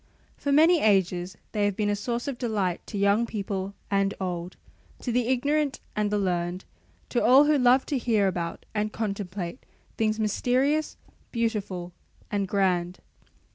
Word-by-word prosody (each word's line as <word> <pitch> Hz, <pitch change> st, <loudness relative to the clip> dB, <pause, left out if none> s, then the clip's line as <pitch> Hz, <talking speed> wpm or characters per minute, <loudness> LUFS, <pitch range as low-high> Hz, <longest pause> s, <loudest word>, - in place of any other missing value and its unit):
For 285 Hz, -, -2 dB
many 320 Hz, +4 st, +5 dB
ages 190 Hz, -3 st, +2 dB
they 210 Hz, -2 st, +1 dB
have 205 Hz, -2 st, 0 dB
been 210 Hz, 0 st, 0 dB
a -, -, +1 dB
source 235 Hz, +5 st, -3 dB
of 270 Hz, -4 st, -4 dB
delight 205 Hz, -7 st, -1 dB
to 205 Hz, -, -5 dB
young 200 Hz, +4 st, +3 dB
people 200 Hz, -2 st, -4 dB, 0.2 s
and 195 Hz, 0 st, +1 dB
old, 180 Hz, -1 st, -4 dB, 0.4 s
to 245 Hz, -, -2 dB
the 240 Hz, 0 st, +1 dB
ignorant 280 Hz, +3 st, +1 dB, 0.2 s
and 210 Hz, -1 st, +1 dB
the 210 Hz, -, 0 dB
learned, 180 Hz, -1 st, -1 dB, 0.4 s
to 240 Hz, -, +1 dB
all 270 Hz, +4 st, +7 dB
who 300 Hz, 0 st, +4 dB
love 250 Hz, +1 st, +5 dB
to 280 Hz, -, -1 dB
hear 220 Hz, -5 st, +2 dB
about 170 Hz, -3 st, -3 dB
and 210 Hz, 0 st, -1 dB
contemplate 200 Hz, -3 st, -4 dB, 0.3 s
things 220 Hz, -1 st, +1 dB
mysterious, 255 Hz, +8 st, +1 dB, 0.3 s
beautiful, 200 Hz, -7 st, -2 dB, 0.4 s
and 200 Hz, -2 st, 0 dB
grand. 185 Hz, -2 st, +1 dB
210 Hz, 155 wpm, -26 LUFS, 190-245 Hz, 0.4 s, all